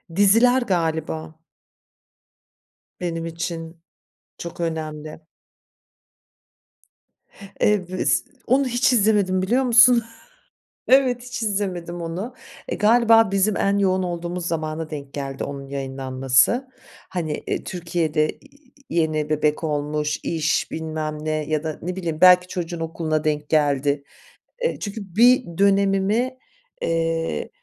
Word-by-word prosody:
Diziler 230 +6 +5
galiba 160 -5 -2 1.6
benim 165 -2 -3
için 165 0 -6 0.6
çok 170 0 -7
önemli. 155 -2 -4 2.4
Eee, 205 -4 +2
bu 185 - -5
iz - - +1 0.2
Onu 265 +2 +3
hiç 250 +2 +2
izlemedim, 200 -4 +2
biliyor 245 +8 +2
musun? 240 -1 +6 0.8
Evet, 255 -2 +4
hiç 250 -1 -6
izlemedim 185 -5 -2
onu. 185 +10 -5 0.4
Eee, - - -2
galiba 225 -1 +5
bizim 195 +1 +1
en 200 0 +1
yoğun 185 -1 +2
olduğumuz 175 0 -4
zamana 155 -1 -3
denk 140 -2 -7
geldi 135 -1 -4
onun 140 -1 -7
yayınlanması. 135 - +1 0.4
Hani, 160 -5 -3
iii, - - -2
Türkiye'de 165 -3 -1
i - - -18 0.5
i - - -4
yeni 155 -2 0
bebek 150 +1 0
olmuş, 150 0 -1
iş, 160 -1 0
bilmem 155 -1 -4
ne 155 - -2
ya 155 0 -1
da 155 -1 -4
ne 180 +2 -4
bileyim, 165 -4 -3
belki 180 0 +7
çocuğun 170 -2 -4
okuluna 160 -1 -2
denk 150 -1 -1
geldi. 145 -2 +1 0.6
Eee, 485 - -1
çünkü 200 -3 -7
bir 240 -7 +4
dönemimi, 200 +5 +2 0.4
eee, 165 0 -1
170 Hz, 115 wpm, -22 LUFS, 155-200 Hz, 2.4 s, belki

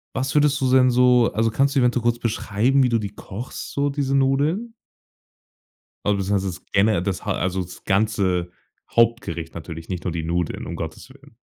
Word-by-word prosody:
was 130 +1 -2
würdest 145 -1 +3
du 130 -1 +1
denn 130 -1 +5
so 125 -1 +4
also, 115 +1 +2
kannst 135 +4 +1
du - - +3
eventuell 125 -1 +2
kurz 120 0 +1
beschreiben, 120 +3 +1
wie 130 - +3
du 115 -1 +2
die 105 -2 -4
kochst, 105 +4 -7
so 140 0 0
diese 140 -1 0
Nudeln? 145 - +1 1.3
Also 105 -1 +2
beziehungsweise 95 0 0
das - - -35
gene 100 -2 +3
das 95 -1 -3
ha - - +1
also, 95 +1 -1
das 90 0 -11
ganze 95 -3 +1 0.4
Hauptgericht 115 -8 +1
natürlich, 80 0 -8
nicht 90 -2 -4
nur 90 - -2
die 80 -1 -3
Nudeln, 85 +1 -2
um - - -5
Gottes 80 +9 -7
Willen. 140 -2 -18
115 Hz, 190 wpm, -22 LUFS, 95-135 Hz, 1.3 s, denn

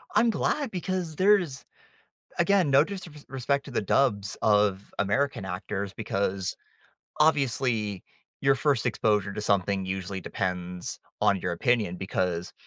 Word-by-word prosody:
I'm 235 - +5
glad 275 +4 0
because 180 -3 -3
there's 185 -8 +3 0.8
again, 180 -3 +3
no 140 +3 +6
disrespect 145 -7 -3
to - - -8
the 115 - -1
dubs 100 -3 +1
of 105 -2 +2
American 100 +2 0
actors 95 +2 -4
because, 95 -1 -2 0.6
obviously, 125 - +1 0.4
your 135 -1 +4
first 135 -5 +1
exposure 105 -4 +1
to 105 - -4
something 100 -1 +1
usually 95 0 -4
depends 90 0 -4 0.2
on 100 -2 +4
your 90 -1 -2
opinion, 105 0 +1
because, 90 -2 -2
105 Hz, 125 wpm, -27 LUFS, 95-145 Hz, 0.8 s, no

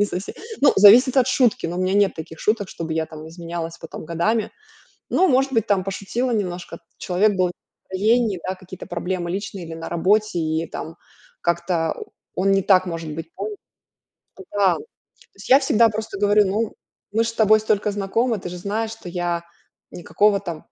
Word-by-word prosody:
не - - +5
совсем 185 -1 -5 0.3
ну, 285 - +6
зависит 235 +7 +7
от 255 -2 +5
шутки, 255 -7 +2
но 170 +1 -4
у - - -2
меня 185 +1 +1
нет 200 -1 +3
таких 160 0 -9
шуток, 210 -2 0
чтобы 165 -3 -5
я 160 0 -1
там 155 0 -10
изменялась 170 0 -6
потом - - -9
годами. 185 +7 0 0.6
Ну, 375 - +3
может 270 0 +2
быть, 225 -4 +1
там 200 -2 +2
пошутила 200 +6 -2
немножко, 180 -6 -3 0.2
человек 195 +4 +2
был 185 -1 +3
не - - -6 0.4
в - - -40
настроении, 215 +1 +2
да, 185 - -1
какие-то 185 -1 -11
проблемы 175 -1 -3
личные 195 0 -4
или 165 - -7
на 165 0 -7
работе, 195 +3 +1
и 160 0 -1
там 165 +1 -7 0.4
как-то 170 -1 0 0.4
он 195 +1 +2
не 195 0 +3
так, 185 -1 +4
может 165 -2 -5
быть. 165 +1 -6 1.3
Да, 200 -2 +3
то - - -9 0.5
есть - - -12
я 270 +2 +7
всегда 230 -4 +4
просто 215 -1 -5
говорю: 205 0 +4
"Ну, 210 +3 -1 0.4
мы 225 +2 +2
ж - - -2
с 230 - -5
тобой 215 -1 +5
столько 210 -1 +1
знакомы, 215 +4 0
ты 180 - -6
же 180 - -7
знаешь, 215 +4 -2
что 225 -5 -10
я 175 -1 -2 0.5
никакого 200 +3 +2
там 170 -5 -7
195 Hz, 190 wpm, -22 LUFS, 175-215 Hz, 1.3 s, зависит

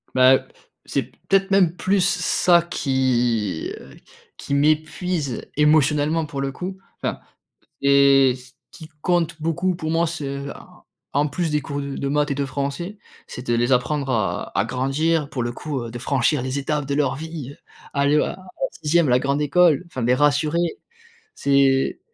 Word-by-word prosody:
Bah, 130 0 +7
heu, - - +1 0.5
c'est - - -1
p - - -21
peut-être 195 0 +3
même 185 -4 +4
plus 190 +1 +1
ça 180 -1 +3
qui, 125 - 0
heu, 65 - -14 0.4
qui - - -5
m'épuise 155 0 0
émotionnellement, 150 +1 +3
pour 140 -2 -5
le 135 0 -2
coup, 185 +6 -6 0.2
enfin - - -2 0.6
et 140 -2 +5
ce 125 0 -14 0.2
qui 160 -3 -12
compte 170 -2 0
beaucoup 175 +3 0
pour 160 -2 -4
moi, 165 +1 +2
ce 140 -4 -4
a - - -9
en - - -21 0.3
en 145 +1 +2
plus 165 +3 -2
des 150 - +1
cours 140 +1 -4
d 140 -1 -5
de 140 - -2
maths 145 +1 +1
et 140 - -1
de 140 0 -1
français, 140 +9 -4 0.3
c'est 125 - -9
de 120 - +2
les 120 +2 +1
apprendre 135 +2 +1
à 110 -5 -1
à 100 - +1
grandir, 140 +6 0
pour 130 - -3
le 120 0 -2
coup, 140 +2 -4
heu, 120 - -6
de 120 - -7
franchir 130 +2 +1
les 130 +2 -2
étapes 145 +1 -2
de 140 - -2
leur 140 -2 +1
vie, 155 -2 -7
heu, - - -20 0.4
aller, 140 +1 +2
heu, - - +2
en - - -7 0.3
6e 160 0 +1
la 125 - +5
grande 140 +3 0
école, 155 +1 +3
enfin 130 -7 -5
les 120 +2 +3
rassurer, 150 +5 +1 0.6
c'est 135 -1 +2
145 Hz, 180 wpm, -22 LUFS, 135-160 Hz, 0.6 s, Bah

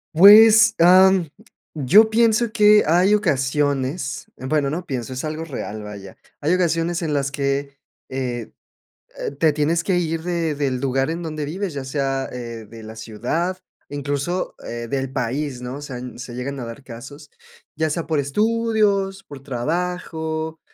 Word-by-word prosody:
Pues, 215 +4 +8
am, 185 0 +6 0.5
yo 195 - +5
pienso 230 0 +2
que 210 -2 +5
hay 180 +6 +4
ocasiones, 140 -4 0
bueno, 140 +2 0
no 170 +5 -4
pienso, 130 -5 -4
es 130 - -5
algo 155 +1 -4
real, 110 -8 -6
vaya. 100 -2 -10 0.2
Hay 155 +4 +1
ocasiones 170 0 0
en 160 -3 -2
las 140 -1 0
que 140 0 -2 0.3
eh 125 -3 -4 0.7
eh - - -3
te 160 -2 +4
tienes 155 +3 +1
que 185 0 +1
ir 165 -2 -1
de 170 -2 -1
del 140 -3 -1
lugar 135 +1 0
en 170 +2 -4
donde 155 -2 -4
vives, 180 +4 -4
ya 140 -2 -5
sea, 135 -1 -2
eh, 115 -2 -7
de 115 -1 -11
la 110 +1 -9
ciudad, 125 +12 -3 0.3
incluso, 145 +5 -3
eh, 120 0 -5
del 135 0 -2
país, 135 +1 -3
¿no? 125 +2 -5
O - - -9
sea, 135 -3 -7
n 125 0 -8
se 125 -1 -8
llegan 135 +3 -4
a 120 - -5
dar 115 +4 -9
casos, 135 +5 -11 0.4
ya 160 +1 0
sea 165 +2 -3
por 155 -2 0
estudios, 205 +3 +1
por 140 -6 -11
trabajo, 160 +3 -3
150 Hz, 160 wpm, -21 LUFS, 130-175 Hz, 0.7 s, Pues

